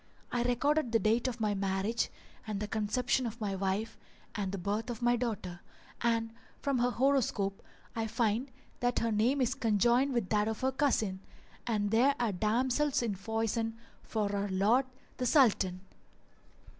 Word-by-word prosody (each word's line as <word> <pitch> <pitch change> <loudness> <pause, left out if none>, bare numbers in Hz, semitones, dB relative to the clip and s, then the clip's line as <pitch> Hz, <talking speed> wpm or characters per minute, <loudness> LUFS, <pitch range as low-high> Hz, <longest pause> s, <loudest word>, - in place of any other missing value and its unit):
I 245 - 0
recorded 250 +3 +1
the 230 - +5
date 225 +4 +2
of 245 -2 -4
my 210 -2 +1
marriage 195 +3 0 0.4
and 210 -2 -2
the 210 - -3
conception 240 +4 0
of 230 +1 -7
my 205 -3 -2
wife 195 +4 -2 0.3
and 200 -3 -2
the 200 - -3
birth 205 +6 -2
of 240 0 -5
my 240 0 +4
daughter; 215 -7 -3 0.4
and 230 -1 +1 0.3
from 275 -3 0
her 245 +1 +3
horoscope 240 -7 +1 0.3
I 225 -1 -1
find 230 +3 0 0.3
that 245 0 0
her 230 0 +1
name 235 +6 +2
is 250 0 +2
conjoined 240 +2 +2
with 235 -6 -1
that 210 0 +2
of 220 -1 -3
her 260 +1 +2
cousin; 225 -9 +1 0.5
[FN#401] 230 - +1
and 205 -1 0
there 255 +5 +4
are 235 -3 +1
damsels 250 +8 +1
in 225 -3 0
foison 225 +2 -2 0.2
for 205 -2 -2
our 200 0 -1
lord 215 +8 +3 0.3
the 250 - 0
Sultan.' 200 - +3
225 Hz, 170 wpm, -31 LUFS, 205-245 Hz, 0.5 s, the